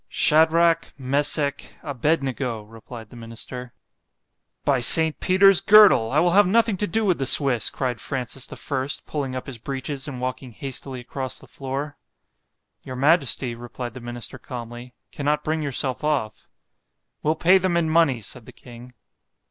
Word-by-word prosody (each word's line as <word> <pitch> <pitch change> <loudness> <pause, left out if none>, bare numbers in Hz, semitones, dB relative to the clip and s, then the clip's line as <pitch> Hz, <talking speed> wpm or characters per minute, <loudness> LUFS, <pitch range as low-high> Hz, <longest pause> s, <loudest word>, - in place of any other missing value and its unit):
——Shadrach, 165 +2 +3
Mesech, 140 +1 -1
Abed 145 +2 -1
nego, 125 -4 -4
replied 115 +1 -12
the - - -13
minister.—By 125 +3 -7
Saint 160 +6 +6
Peter's 190 0 +5
girdle, 200 - +6
I 140 - 0
will 175 +3 +3
have 200 +1 +5
nothing 225 +1 +2
to 210 - -2
do 225 +1 -1
with 180 -6 +1
the 135 - 0
Swiss, 130 -6 +4
cried 125 -5 -4
Francis 130 -1 -4
the - - -10
First, 135 0 -2
pulling 135 -4 -4
up 130 - -5
his 130 -4 -8
breeches 135 +3 -5
and 135 -3 -7
walking 130 -1 -5
hastily 130 0 -6
across 130 +1 -5
the - - -12
floor. 140 +2 -6 0.8
Your 130 - -8
majesty, 135 -3 +2
replied 120 0 -8
the 130 - -9
minister 120 0 -7
calmly, 120 0 -9 0.2
cannot 150 +1 -2
bring 155 +1 -2
yourself 135 -2 -1
off. 140 -8 -2 0.7
We'll 155 +1 0
pay 180 +4 +4
them 185 -2 0
in 170 -1 +1
money——said 130 -8 0
the - - -11
king. 120 0 -14
135 Hz, 155 wpm, -23 LUFS, 125-155 Hz, 0.8 s, Saint